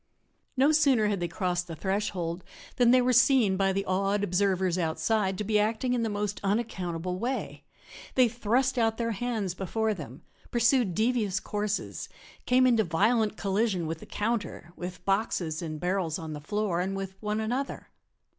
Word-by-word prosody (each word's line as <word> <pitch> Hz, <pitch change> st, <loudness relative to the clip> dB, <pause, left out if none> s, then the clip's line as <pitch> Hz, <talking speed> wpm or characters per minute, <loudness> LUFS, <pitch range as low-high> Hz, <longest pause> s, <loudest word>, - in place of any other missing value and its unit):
No 275 Hz, +4 st, +5 dB
sooner 275 Hz, -9 st, +4 dB
had 200 Hz, -2 st, -1 dB
they 175 Hz, -, -1 dB
crossed 180 Hz, 0 st, -2 dB
the 165 Hz, -, -6 dB
threshold 185 Hz, -1 st, -2 dB, 0.3 s
than 245 Hz, -1 st, +5 dB
they 255 Hz, 0 st, +5 dB
were 255 Hz, +1 st, +2 dB
seen 240 Hz, -4 st, +5 dB
by 195 Hz, 0 st, +2 dB
the 195 Hz, +1 st, -1 dB
awed 195 Hz, +2 st, 0 dB
observers 185 Hz, -1 st, +1 dB
outside 190 Hz, +4 st, 0 dB
to 210 Hz, -, -2 dB
be 210 Hz, +1 st, +2 dB
acting 225 Hz, +4 st, 0 dB
in 245 Hz, -, +1 dB
the 225 Hz, -, 0 dB
most 205 Hz, 0 st, -3 dB
unaccountable 185 Hz, -4 st, -2 dB
way. 255 Hz, +4 st, -3 dB, 0.5 s
They 255 Hz, -2 st, +6 dB
thrust 245 Hz, +3 st, 0 dB
out 225 Hz, -1 st, +2 dB
their 230 Hz, -1 st, -1 dB
hands 220 Hz, -4 st, -2 dB
before 215 Hz, +4 st, -1 dB
them, 145 Hz, -, -9 dB, 0.3 s
pursued 235 Hz, -5 st, +2 dB
devious 220 Hz, -4 st, +1 dB
courses, 210 Hz, 0 st, -3 dB, 0.4 s
came 255 Hz, +1 st, +5 dB
into 235 Hz, -3 st, +4 dB
violent 215 Hz, +5 st, +1 dB
collision 195 Hz, -2 st, 0 dB
with 160 Hz, 0 st, -4 dB
the -, -, -12 dB
counter, 210 Hz, -5 st, -3 dB
with 180 Hz, 0 st, -7 dB
boxes 195 Hz, -5 st, 0 dB
and 155 Hz, -2 st, -5 dB
barrels 180 Hz, -2 st, -1 dB
on 160 Hz, -3 st, -6 dB
the 150 Hz, -, -7 dB
floor, 195 Hz, +1 st, -1 dB
and 190 Hz, +2 st, -2 dB
with 190 Hz, -1 st, -5 dB
one 210 Hz, 0 st, -1 dB
another. 245 Hz, +5 st, -3 dB
205 Hz, 170 wpm, -28 LUFS, 180-230 Hz, 0.5 s, They